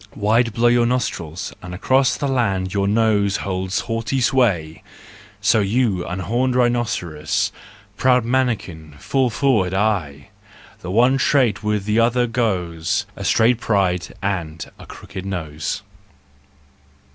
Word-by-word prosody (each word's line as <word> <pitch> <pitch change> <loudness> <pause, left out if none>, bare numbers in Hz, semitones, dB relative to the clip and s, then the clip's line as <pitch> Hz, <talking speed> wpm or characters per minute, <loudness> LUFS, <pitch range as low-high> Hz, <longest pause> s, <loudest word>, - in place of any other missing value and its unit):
Wide 115 +3 +2
blow 120 +2 +2
your 120 0 +4
nostrils, 90 -9 -3
and 90 0 -7
across 130 +7 +2
The 140 - -2
land 100 -8 0
your 100 -1 +1
nose 105 -2 +2
holds 95 0 -2
haughty 115 +3 -2
sway: 110 -12 +1 0.6
So 110 +2 +3
you, 100 -2 +1
unhorned 120 +8 -1
rhinoceros, 115 - 0 0.5
Proud 125 -2 +3
mannikin, 105 - -2
fall 130 - 0
forward 110 -8 +1
aye! 90 -10 -1 0.5
The 90 - -8
one 125 +7 +3
trait 125 -9 +2
with 105 -2 -1
the 105 +2 +1
other 120 +1 +3
goes: 100 -5 -1
A 100 - -7
straight 115 +4 +3
pride 95 -6 0 0.2
and 85 -5 -3
a - - -12
crooked 95 - -9
nose. 85 -2 -4
105 Hz, 125 wpm, -20 LUFS, 90-120 Hz, 0.6 s, your